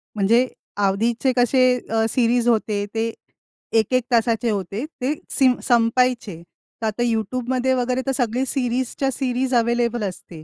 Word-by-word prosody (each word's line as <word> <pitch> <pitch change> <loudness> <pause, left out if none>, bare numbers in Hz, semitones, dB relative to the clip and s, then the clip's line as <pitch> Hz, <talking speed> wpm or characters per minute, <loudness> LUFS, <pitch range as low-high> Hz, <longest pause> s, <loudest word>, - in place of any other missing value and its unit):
म्हणजे 230 +5 +3 0.3
आधीचे 225 +6 +1
कसे 245 +2 +3 0.3
अ, 225 0 +1
सीरीज 240 0 +1
होते, 215 -3 +1
ते 225 +1 0 0.7
1:00-1:00 250 +3 +1
तासाचे 230 -1 +2
होते, 200 - -3
ते 290 -2 -3 0.2
सिम 260 -3 +3
संपायचे. 230 -6 +1 0.4
तर - - -2
आता 220 +3 -1
YouTubeमध्ये 250 +3 0
वगैरे 250 0 0
तर 270 - 0
सगळी 245 0 0
सीरीजच्या 260 +1 -1
सीरीज 260 0 -1
अव्हेलेबल 235 -1 +1
असते. 175 -4 -7
240 Hz, 130 wpm, -22 LUFS, 220-255 Hz, 0.7 s, म्हणजे